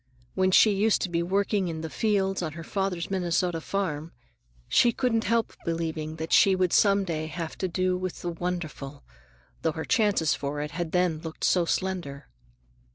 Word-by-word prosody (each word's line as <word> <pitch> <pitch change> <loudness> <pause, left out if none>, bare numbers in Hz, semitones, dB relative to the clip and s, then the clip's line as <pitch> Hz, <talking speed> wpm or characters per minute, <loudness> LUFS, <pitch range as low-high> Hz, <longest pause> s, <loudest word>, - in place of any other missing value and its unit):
When 185 0 +2
she 210 +3 +6
used 205 +2 +2
to 185 - -2
be 170 -1 0
working 195 +2 0
in 160 -2 -4
the 160 - -5
fields 195 -3 0
on 160 -3 -3
her 165 +1 -8
father's 190 0 -2
Minnesota 175 -2 0
farm, 165 -4 -3 0.5
she 240 - +4
couldn't 230 -2 0
help 230 -1 +1
believing 160 -2 -3
that 160 0 -4
she 195 -1 +6
would 185 -2 +1
some 200 -1 +4
day 155 -4 -3
have 160 +1 -5
to 190 - 0
do 185 +1 0
with 185 -1 -5
the 175 - -1
"wonderful," 160 -5 -5 0.6
though 160 - 0
her 160 - -5
chances 205 -9 +2
for 145 +1 -3
it 150 0 -4
had 170 -1 -4
then 180 -3 +1
looked 160 -1 -8
so 180 -2 +3
slender. 170 -7 -3
175 Hz, 180 wpm, -27 LUFS, 160-195 Hz, 0.6 s, she